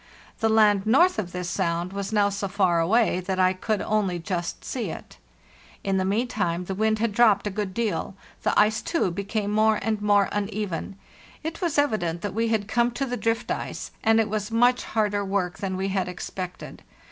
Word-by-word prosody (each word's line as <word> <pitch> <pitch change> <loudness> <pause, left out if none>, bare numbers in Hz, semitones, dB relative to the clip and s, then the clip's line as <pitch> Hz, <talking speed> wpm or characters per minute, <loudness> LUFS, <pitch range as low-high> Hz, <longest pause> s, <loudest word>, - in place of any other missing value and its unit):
The 225 - +2
land 210 -2 +4
north 340 +9 +4
of 180 -4 -4
this 180 0 -4
sound 175 0 -1
was 200 0 -4
now 205 -2 +3
so 200 0 -3
far 185 -3 +2
away 200 +3 +2
that 185 +1 -3
I 185 0 +4
could 210 +3 -2
only 205 -4 0
just 175 0 -4
see 250 -3 -3
it. - - -9 0.7
In 195 -1 0
the 190 - +1
meantime 195 -4 -1
the 190 - -3
wind 220 +2 +1
had 230 0 0
dropped 210 -2 +4
a 205 - -1
good 200 -1 -3
deal; 195 -4 -2 0.3
the - - +2
ice, 215 +1 +3
too, 330 - 0
became 200 +3 -2
more 215 0 +3
and 215 0 -1
more 205 -1 +4
uneven 200 -2 -3 0.5
—it 320 +3 -5
was 340 -5 0
evident 210 - +1
that 205 - -3
we 225 +2 0
had 220 -3 0
come 235 +2 +2
to 275 +3 -1
the 245 -1 -3
drift 230 -1 -1
ice, - - -4
and 225 0 +4
it 220 - +2
was 210 0 -3
much 245 +2 +3
harder 205 -2 0
work 190 -2 -2
than 190 -2 -3
we 190 +1 -1
had 190 -1 -1
expected. 180 0 -7
205 Hz, 200 wpm, -25 LUFS, 190-220 Hz, 0.7 s, land